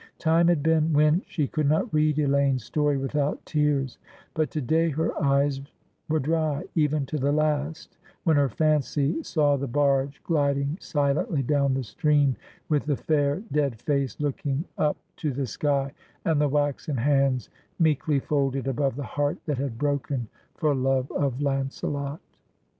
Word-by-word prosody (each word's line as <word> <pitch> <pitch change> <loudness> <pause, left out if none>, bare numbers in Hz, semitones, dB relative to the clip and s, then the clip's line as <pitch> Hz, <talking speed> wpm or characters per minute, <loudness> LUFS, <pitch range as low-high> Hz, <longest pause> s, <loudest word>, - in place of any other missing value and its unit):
Time 165 +1 +3
had 170 -5 +2
been 160 0 +2
when 150 +4 +4
she 150 -5 -1
could 150 -1 0
not 155 +1 +1
read 155 -1 +2
Elaine's 140 -3 +2
story 145 +4 0
without 140 +2 -1
tears, 145 -4 0 0.3
but 155 -1 0
to 155 - -3
day 160 +5 +2
her 160 +2 -1
eyes 140 0 +2 0.5
were 155 - +2
dry, 155 0 0
even 150 -3 +1
to 150 +3 -3
the 140 +2 +1
last, 155 +1 -1 0.3
when 160 -2 +3
her 140 -2 +3
fancy 150 - +1
saw 150 - +2
the 140 0 -3
barge 140 +1 +1
gliding 140 -2 +1
silently 145 - 0
down 140 0 +2
the 135 - -1
stream, 145 +2 +2 0.3
with 150 -3 +1
the 145 -3 +1
fair 145 +3 0
dead 140 -6 0
face 140 -2 -1
looking 145 +1 -2
up 150 -1 +1 0.2
to 150 - -1
the 135 +1 -2
sky, 140 +2 -1 0.3
and 155 -3 +2
the 145 - +2
waxen 145 0 -1
hands 135 -2 +1 0.3
meekly 155 -3 +2
folded 135 -2 -1
above 135 0 0
the 145 - -4
heart 145 +3 -1
that 145 -5 -2
had 135 -4 -3
broken 140 -3 -1 0.3
for 150 -2 +1
love 130 0 0
of 135 -3 -1
Launcelot. 140 +1 -2
145 Hz, 160 wpm, -26 LUFS, 135-150 Hz, 0.5 s, when